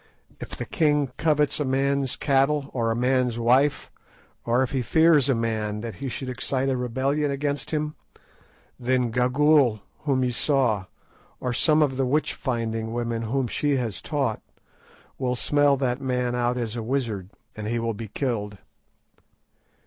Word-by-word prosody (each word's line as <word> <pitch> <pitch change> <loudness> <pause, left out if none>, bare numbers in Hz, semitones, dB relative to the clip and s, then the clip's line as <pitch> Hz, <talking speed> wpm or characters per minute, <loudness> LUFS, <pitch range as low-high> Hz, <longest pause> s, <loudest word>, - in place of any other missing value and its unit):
If - - -6
the - - -4
king 150 - +1
covets 150 -3 +2
a - - +1
man's 135 0 0
cattle, 140 0 +1
or 115 -3 0
a 115 - 0
man's 125 -1 +1
wife, 130 +5 +2 0.5
or 120 +2 +2
if 130 - -3
he 135 -2 0
fears 155 +2 +4
a 135 - +3
man 110 -2 -2
that 115 -1 -5
he 135 - -2
should 130 +2 -4
excite 130 +1 -1
a 130 - +1
rebellion 130 +4 0
against 145 +1 -2
him, 150 -1 -2 0.9
then 125 -1 +1
Gagool, 125 -1 +3 0.2
whom 135 -3 0
ye 125 - +1
saw, 120 -6 +1 0.5
or 125 -1 -2
some 155 +4 +4
of 135 -3 -1
the 135 - +1
witch 150 +4 +1
finding 115 -3 -3
women 115 -1 -2
whom 125 +4 -1
she 145 +4 0
has 120 -6 -2
taught, 135 -7 -1 0.8
will 125 -2 0
smell 145 +2 +3
that 130 -1 -1
man 125 -2 -1
out 125 0 0
as 115 -2 -3
a 115 - -3
wizard, 110 -6 -2 0.3
and 110 -1 -5
he 120 +2 -1
will 115 0 -1
be 110 +1 -7
killed. 105 -4 -3
130 Hz, 165 wpm, -25 LUFS, 115-140 Hz, 0.9 s, fears